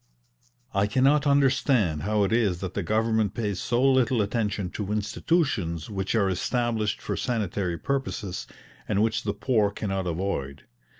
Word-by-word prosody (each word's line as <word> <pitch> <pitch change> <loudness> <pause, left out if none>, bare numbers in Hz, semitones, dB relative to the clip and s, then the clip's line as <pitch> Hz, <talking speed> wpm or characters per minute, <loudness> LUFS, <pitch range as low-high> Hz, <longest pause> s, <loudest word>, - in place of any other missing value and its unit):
I 100 0 +2
cannot 135 +7 +3
understand 130 - +3
how 105 +4 +1
it 100 - 0
is 105 -7 +2
that 95 -1 -4
the 100 - -1
government 110 +2 +1
pays 105 -5 -2
so 120 +1 +1
little 130 -3 +3
attention 105 -3 -2
to 105 -1 -4
institutions 105 - -1
which 95 +1 -2
are 105 -3 +3
established 110 +3 -1
for - - -3
sanitary 100 -7 -2
purposes 125 -8 -3 0.4
and 100 - +2
which 110 0 0
the 105 -3 -2
poor 110 -2 +2
cannot 95 -2 -3
avoid. 80 -6 -3
105 Hz, 145 wpm, -26 LUFS, 95-120 Hz, 0.4 s, cannot